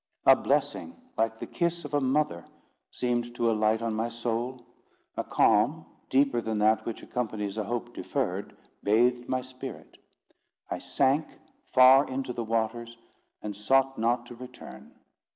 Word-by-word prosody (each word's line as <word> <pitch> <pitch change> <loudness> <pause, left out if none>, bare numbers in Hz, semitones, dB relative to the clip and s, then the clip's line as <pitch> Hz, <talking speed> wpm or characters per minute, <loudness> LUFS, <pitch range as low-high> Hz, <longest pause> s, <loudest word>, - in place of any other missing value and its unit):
A - - +9
blessing, 260 - -1 0.2
like 115 0 0
the - - -6
kiss 170 -1 -2
of - - -8
a 145 - +2
mother, 130 - +1 0.5
seemed 120 -1 -2
to 120 -1 +2
alight 110 +1 +1
on 115 -1 -1
my 110 +2 -1
soul; 120 +2 -3 0.5
a - - -2
calm, - - +3 0.2
deeper 135 -3 +3
than 110 -1 -2
that 110 +1 +2
which 115 - -5
accompanies 105 -4 -3
a 110 -1 -2
hope 120 +1 -4
deferred, 105 -10 -3 0.2
bathed 120 +4 +2
my 130 0 0
spirit. 130 +1 -10 0.7
I - - -2
sank 140 +3 +1 0.4
far 130 +2 +7
into 130 -1 -3
the 120 - -3
waters, 115 +1 -2 0.5
and 105 -1 -4
sought 135 +6 +2
not 120 +1 +1
to 120 - -10
return. 120 - -11
120 Hz, 150 wpm, -28 LUFS, 110-130 Hz, 0.7 s, A